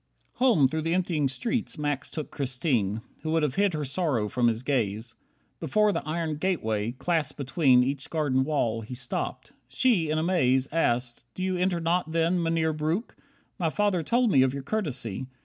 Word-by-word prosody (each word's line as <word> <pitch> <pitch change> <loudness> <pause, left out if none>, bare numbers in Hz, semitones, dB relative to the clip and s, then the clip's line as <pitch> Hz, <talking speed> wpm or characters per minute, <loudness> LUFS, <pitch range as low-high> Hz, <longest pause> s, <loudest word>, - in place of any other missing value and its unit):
26 - - -29
Home, 230 - +5
through 160 +4 -2
the 165 +2 0
emptying 170 -6 +1
streets, 220 - -2
Max 145 -2 -2
took 155 -2 -6
Christine, 125 - -1 0.2
Who 155 - -4
would 165 -1 +2
have 145 -4 0
hid 200 0 +1
her 150 -1 -2
sorrow 135 -7 0
from 120 +1 +1
his 115 +1 0
gaze. 115 -4 -1 0.5
Before 210 -1 +2
the 165 - -1
iron 160 -1 -2
gateway, 115 - -1
clasped 160 +2 -1
between 135 -2 +3
Each 135 +1 -3
garden 145 -5 +1
wall, 120 -6 0
he 115 +3 -7
stopped. 125 0 -4 0.2
She, 210 -12 +2
in 155 - 0
amaze, 135 -6 +2
Asked, 125 -6 0
"Do 185 - -4
you 185 0 0
enter 180 -1 +1
not 165 -1 0
then, 165 +2 +2
Mynheer 165 -1 +1
Breuck? 155 +9 -2 0.4
My 165 -3 +1
father 205 0 +1
told 235 +7 +2
me 135 - +5
of 130 +1 +2
your 140 - -5
courtesy. 130 - -2
150 Hz, 185 wpm, -27 LUFS, 130-170 Hz, 0.5 s, Home